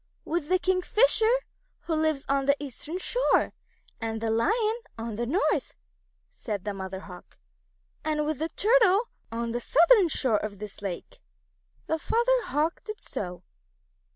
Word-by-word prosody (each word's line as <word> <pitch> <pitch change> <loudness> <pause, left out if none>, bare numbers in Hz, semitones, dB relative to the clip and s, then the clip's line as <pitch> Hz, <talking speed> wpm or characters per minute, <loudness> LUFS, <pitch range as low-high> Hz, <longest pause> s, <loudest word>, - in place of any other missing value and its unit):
"With 315 -2 -2
the 370 - +4
Kingfisher, 400 +5 +3 0.5
who 335 - -3
lives 310 -3 0
on 275 0 +1
the 280 - +5
eastern 290 +4 -5
shore, - - +2 0.5
and 225 0 -2
with 225 - -5
the 225 -1 0
Lion 435 - +1 0.2
on 225 -1 -4
the 235 +2 -2
north," 355 - 0 0.5
said 205 -5 -5
the 205 - -2
Mother 190 -1 -6
Hawk, 180 -3 -13 0.7
"and 305 -1 0
with 310 -2 -2
the 320 +1 -1
Turtle 415 +6 +1 0.2
who - - +4
lives 440 +5 +1 0.4
on 230 - -3
the 240 - -1
southern 345 - +5
shore 255 -7 +2
of 210 -1 -5
this 210 0 -8
lake." 190 -4 -6 0.7
The 320 - -1
Father 475 +6 +2
Hawk 310 +3 -1
did 430 -1 -7
so. 180 -2 -6
300 Hz, 160 wpm, -27 LUFS, 225-370 Hz, 0.7 s, the